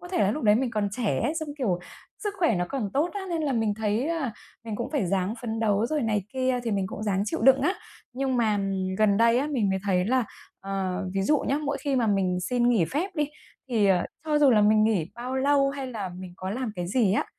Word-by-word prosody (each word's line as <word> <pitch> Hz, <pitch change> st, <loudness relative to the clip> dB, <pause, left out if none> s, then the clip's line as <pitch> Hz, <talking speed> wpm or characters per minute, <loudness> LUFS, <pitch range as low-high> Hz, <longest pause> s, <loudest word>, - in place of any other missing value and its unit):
có 355 Hz, -, -10 dB
thể 370 Hz, -, -2 dB
là 200 Hz, -1 st, +3 dB
lúc 300 Hz, -, -3 dB
đấy 210 Hz, -1 st, +5 dB
mình 245 Hz, +1 st, 0 dB
còn 210 Hz, -2 st, 0 dB
trẻ 235 Hz, -3 st, -1 dB
ấy, 300 Hz, -, 0 dB
xong, 315 Hz, -2 st, -3 dB
kiểu, 190 Hz, -9 st, 0 dB, 0.4 s
sức 415 Hz, -2 st, -3 dB
khỏe 330 Hz, -, +3 dB
nó 175 Hz, 0 st, 0 dB
còn 230 Hz, -8 st, -3 dB
tốt 315 Hz, +5 st, +2 dB
á, 405 Hz, -, -4 dB
nên 330 Hz, -2 st, -1 dB
là 280 Hz, -3 st, 0 dB
mình 220 Hz, -3 st, +1 dB
thấy 220 Hz, +5 st, -1 dB
là 315 Hz, -8 st, -1 dB, 0.3 s
mình 215 Hz, -2 st, -4 dB
cũng 235 Hz, -, -4 dB
phải 275 Hz, -, 0 dB
ráng 190 Hz, +3 st, 0 dB
phấn 225 Hz, -2 st, -3 dB
đấu 215 Hz, 0 st, +2 dB
rồi 300 Hz, 0 st, -1 dB
này 210 Hz, -4 st, 0 dB
kia, 255 Hz, -1 st, 0 dB
thì 230 Hz, -, -2 dB
mình 195 Hz, -2 st, 0 dB
cũng 210 Hz, -, -7 dB
ráng 200 Hz, -2 st, 0 dB
chịu -, -, -2 dB
đựng 265 Hz, +1 st, +6 dB
á. 360 Hz, +8 st, +1 dB, 0.4 s
Nhưng 260 Hz, 0 st, -1 dB
mà 215 Hz, -3 st, +2 dB, 0.4 s
gần 210 Hz, -2 st, +4 dB
đây 230 Hz, +2 st, +4 dB
á 280 Hz, -, 0 dB
mình 240 Hz, -10 st, 0 dB
mới 190 Hz, -, 0 dB
thấy 185 Hz, -2 st, +2 dB
là 255 Hz, +2 st, +2 dB, 0.4 s
ờ, 195 Hz, -1 st, -3 dB
ví 195 Hz, -, +1 dB
dụ 300 Hz, +7 st, +3 dB
nhé, 280 Hz, +2 st, 0 dB
mỗi 285 Hz, -1 st, -1 dB
khi 280 Hz, -2 st, 0 dB
mà 235 Hz, -3 st, +2 dB
mình 185 Hz, -3 st, +1 dB
xin 240 Hz, +5 st, +1 dB
nghỉ 225 Hz, -8 st, +3 dB
phép 310 Hz, -, -2 dB
đi 295 Hz, -1 st, +1 dB, 0.4 s
thì, 220 Hz, -5 st, +2 dB
ờ, 185 Hz, -2 st, +3 dB, 0.2 s
cho 300 Hz, -1 st, +2 dB
dù 285 Hz, -2 st, +6 dB
là 215 Hz, -3 st, +5 dB
mình 215 Hz, +1 st, +5 dB
nghỉ 195 Hz, -7 st, +1 dB
bao 250 Hz, +2 st, -5 dB
lâu 275 Hz, 0 st, +3 dB
hay 275 Hz, -1 st, -5 dB
là 215 Hz, -6 st, -4 dB
mình 185 Hz, -1 st, -8 dB
có 185 Hz, +1 st, -5 dB
làm 240 Hz, -1 st, -3 dB
cái 175 Hz, -1 st, -3 dB
gì 215 Hz, -2 st, +2 dB
á, 210 Hz, -, +1 dB
230 Hz, 260 wpm, -26 LUFS, 200-270 Hz, 0.4 s, đựng